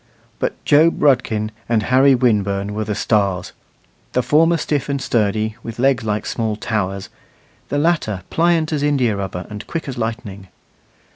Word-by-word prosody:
But - - -1
Job 160 +3 +4
Rudkin 115 -6 +2 0.2
and 110 -3 +2
Harry 130 +3 +5
Winburn 105 -4 +1
were 110 +1 -2
the 105 - -2
stars 100 -5 0 0.6
the 125 - +1
former 165 +5 +4
stiff 145 -3 -2
and 140 0 -1
sturdy, 110 -3 0
with 115 0 -7
legs 130 -1 +2
like 105 -1 -2
small 110 -2 -2
towers; 100 -3 -3 0.6
the 145 - -1
latter 145 - 0
pliant 165 -1 +2
as 150 - -1
indiarubber 105 -11 0
and 105 0 -8
quick 165 -3 -4
as 130 -2 -5
lightning. 110 -4 -5
115 Hz, 150 wpm, -19 LUFS, 105-140 Hz, 0.6 s, Harry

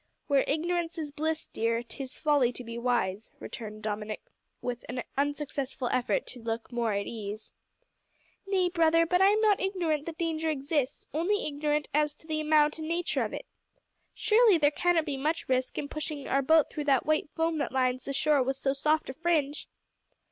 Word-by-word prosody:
"`Where 280 -2 +4
ignorance 335 +3 -1
is 305 -3 -4
bliss,' 315 +2 -2
dear, 230 +1 -1
`'tis 260 +2 -7
folly 290 -5 +3
to 250 - -8
be 230 0 -7
wise,'" 235 -4 0
returned 215 -1 -8
Dominick, 210 0 -4 0.4
with 245 -1 -4
an 250 -1 -3
unsuccessful 280 -2 -2
effort 255 -1 +1
to 245 - -9
look 225 +1 -4
more 235 -2 0
at 200 0 -1
ease. 215 -1 -6 1.0
"Nay, 375 -2 +2
brother, 330 -1 +4
but 360 +2 +2
I 385 - +7
am 420 +2 +4
not 420 -3 +4
ignorant 340 -6 -1
that 325 -1 -5
danger 325 -1 -1
exists 285 -2 -1
only 360 +7 +1
ignorant 295 0 -1
as 300 0 +2
to - - -18
the 310 -1 -2
amount 305 0 +3
and 310 - -4
nature 340 +1 0
of - - -3
it. - - -6 0.7
Surely 435 -3 +5
there 295 -2 +4
cannot 345 0 +2
be 285 -4 -3
much 310 +4 -1
risk 255 0 0
in 285 - -2
pushing 300 -1 -5
our 275 - +2
boat 315 +2 +4
through 295 - -4
that 270 -3 +3
white 310 -1 +1
foam 325 -1 0
that - - -1
lines 255 -1 0
the 275 - -3
shore 290 0 +3
with 265 +1 0
so 270 0 0
soft 305 +3 +1
a - - -10
fringe." 305 -2 0
295 Hz, 190 wpm, -29 LUFS, 255-320 Hz, 1.0 s, I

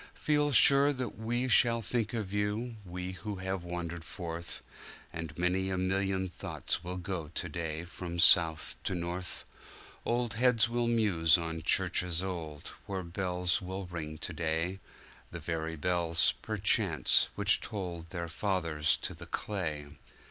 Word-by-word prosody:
Feel 150 -1 +2
sure 140 +2 +7
that 125 -4 -4
we 120 +3 -1
shall 115 -2 +4
think 115 -1 -1
of 105 -4 -3
you, 105 +3 -1
we 90 0 -5
who 100 +2 -6
have 95 -1 -3
wandered 85 -1 -5
forth, 85 0 -7 0.5
And 80 -2 -6
many 90 +2 +1
a 95 - -1
million 95 0 0
thoughts 90 - -3
will 90 +1 -4
go 90 -3 -4
to 85 +2 -4
day 80 0 -3
from 90 0 -6
south 80 -2 +5
to 95 - 0
north; 90 +1 -4 0.6
Old 120 -2 0
heads 115 0 +4
will 120 0 0
muse 95 -8 +4
on 80 -1 -4
churches 85 +2 +2
old, 80 -6 -5 0.2
where 95 -2 -3
bells 90 0 0
will 95 +1 -5
ring 80 -3 -6
to 90 - -4
day—The 85 +4 -4
very 80 -1 -3
bells, 85 0 +2
perchance, - - +2
which - - +3
tolled 85 -5 -5
their 85 -2 -4
fathers 85 -3 +1
to - - -1
the - - -10
clay. 80 -8 -2
90 Hz, 145 wpm, -31 LUFS, 85-105 Hz, 0.6 s, sure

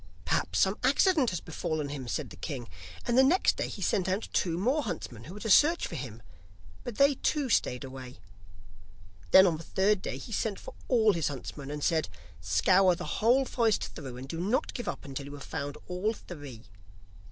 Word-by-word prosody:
'Perhaps 85 +2 0
some 190 - +2
accident 285 - +4
has 180 - -3
befallen 155 -2 -3
him,' 140 -3 -6
said - - -3
the - - -9
king, 130 -7 -6 0.4
and 240 - +1
the - - +8
next 330 +8 +4
day - - -1
he - - -6
sent 185 -1 +1
out 195 +4 -1
two 170 -3 +1
more 255 - +1
huntsmen 125 - -6
who 180 - -9
were - - -8
to 220 - -5
search 330 - +5
for - - -7
him, 120 -7 -7 0.6
but 245 -4 -6
they 280 +1 +5
too 280 0 -1
stayed 125 - +1
away. 130 -1 -9 1.1
Then 190 - +8
on 170 -4 +2
the 165 - -9
third 195 +2 +1
day, 130 - -4
he 135 - -9
sent 215 -2 -1
for - - -10
all 220 -4 +4
his 165 -4 0
huntsmen, 140 0 -6
and 150 0 -5
said: 160 -2 +1 0.3
'Scour 185 -3 +4
the - - -5
whole 250 +5 +4
forest 230 -4 +1
through, 130 -5 -7
and 130 +2 -8
do 165 +4 -5
not 220 - 0
give 240 - -5
up - - -4
until 140 0 -6
you 140 - -9
have 140 -1 -8
found 145 0 -5
all 185 +5 -1
three. 145 - -10
180 Hz, 205 wpm, -29 LUFS, 140-230 Hz, 1.1 s, the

